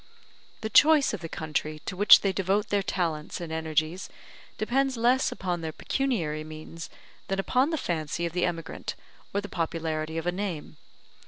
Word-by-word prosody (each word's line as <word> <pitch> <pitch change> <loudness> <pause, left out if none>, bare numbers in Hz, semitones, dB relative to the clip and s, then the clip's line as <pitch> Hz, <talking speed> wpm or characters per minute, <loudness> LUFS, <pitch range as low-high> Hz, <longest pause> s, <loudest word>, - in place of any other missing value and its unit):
The 220 - -3
choice 300 -1 +6
of 210 - -3
the 165 - -6
country 155 -1 -3
to 185 - -4
which 205 +3 +8
they 195 -1 +1
devote 195 +3 0
their 205 -1 +2
talents 165 -5 -2
and 170 -2 -6
energies 160 +2 -1 0.5
depends 265 +3 +1
less 245 +3 +3
upon 180 -2 -3
their 160 -1 -3
pecuniary 165 - -1
means 155 +1 -8 0.4
than 195 - -1
upon 255 +8 +2
the 320 - -1
fancy 165 - -2
of 170 - -3
the 180 0 0
emigrant 165 -2 -4 0.4
or 200 - 0
the 205 - -7
popularity 160 -3 -2
of 165 - -3
a 175 - +2
name. 180 -4 -4
175 Hz, 170 wpm, -27 LUFS, 160-205 Hz, 0.5 s, which